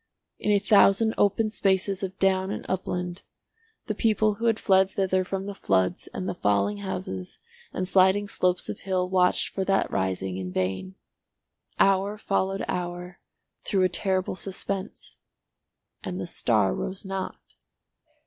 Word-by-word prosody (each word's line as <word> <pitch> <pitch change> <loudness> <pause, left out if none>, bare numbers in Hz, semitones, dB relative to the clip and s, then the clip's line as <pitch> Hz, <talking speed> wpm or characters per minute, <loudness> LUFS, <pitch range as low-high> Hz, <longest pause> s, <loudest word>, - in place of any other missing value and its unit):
In - - -2
a 205 - +5
thousand 205 +1 +4
open 215 +2 +2
spaces 195 -1 +1
of 190 -1 -4
down 190 0 +2
and - - -5
upland 180 -1 -3 0.6
the 215 - -2
people 215 0 +2
who 225 +3 -5
had 225 -2 +3
fled 190 -2 +3
thither 190 -1 0
from 190 +1 -4
the 200 - -5
floods 95 - 0
and 185 - -4
the - - -1
falling 100 - +1
houses 95 -1 -5 0.3
and 185 - -2
sliding 190 +2 +4
slopes 180 -2 +1
of - - -5
hill 185 -2 -1
watched 180 -1 +2
for 195 - -2
that 195 0 +1
rising 95 0 -1
in 90 -1 -5
vain. 95 0 -2 0.8
Hour 195 +2 +3
followed 195 -2 -1
hour 180 0 -4 0.4
through 195 -2 +1
a 185 - +3
terrible 185 +1 -1
suspense, 190 0 -5 0.8
and 180 - -4
the - - -3
star 110 - +2
rose 190 +2 -4
not. 195 0 -6
190 Hz, 150 wpm, -26 LUFS, 175-195 Hz, 0.8 s, a